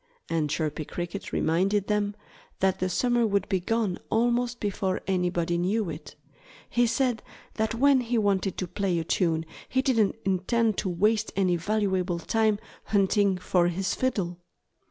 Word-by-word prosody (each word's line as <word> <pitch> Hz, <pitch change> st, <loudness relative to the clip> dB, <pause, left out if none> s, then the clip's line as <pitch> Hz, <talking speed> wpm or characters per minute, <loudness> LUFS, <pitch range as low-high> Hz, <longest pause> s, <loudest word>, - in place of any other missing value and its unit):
And 160 Hz, -3 st, +1 dB
Chirpy 155 Hz, 0 st, -2 dB
Cricket 175 Hz, +5 st, -5 dB
reminded 190 Hz, +5 st, +1 dB
them 205 Hz, -1 st, 0 dB, 0.4 s
that 190 Hz, -1 st, +1 dB
the 185 Hz, -, 0 dB
summer 240 Hz, +3 st, +2 dB
would 200 Hz, -1 st, 0 dB
be 190 Hz, -2 st, +1 dB
gone 210 Hz, 0 st, -1 dB
almost 240 Hz, +1 st, +1 dB
before 190 Hz, -2 st, -1 dB
anybody 175 Hz, -2 st, 0 dB
knew 190 Hz, +1 st, 0 dB
it. 155 Hz, +2 st, -9 dB, 0.5 s
He 240 Hz, 0 st, +2 dB
said 240 Hz, 0 st, 0 dB, 0.3 s
that 220 Hz, 0 st, -1 dB
when 275 Hz, +2 st, +5 dB
he 240 Hz, 0 st, -1 dB
wanted 200 Hz, -3 st, +1 dB
to 185 Hz, -, -2 dB
play 185 Hz, 0 st, -1 dB
a 165 Hz, -, -1 dB
tune 165 Hz, -1 st, 0 dB, 0.2 s
he 260 Hz, 0 st, +1 dB
didn't 225 Hz, -7 st, +2 dB
intend 205 Hz, +4 st, +1 dB
to 195 Hz, -, -1 dB
waste 210 Hz, +5 st, +1 dB
any 185 Hz, -3 st, +2 dB
valuable 190 Hz, -1 st, 0 dB
time 215 Hz, +4 st, +1 dB, 0.3 s
hunting 200 Hz, -1 st, +2 dB
for 180 Hz, -1 st, +2 dB
his 175 Hz, +1 st, -1 dB
fiddle. 185 Hz, -9 st, -1 dB
195 Hz, 155 wpm, -27 LUFS, 180-220 Hz, 0.5 s, when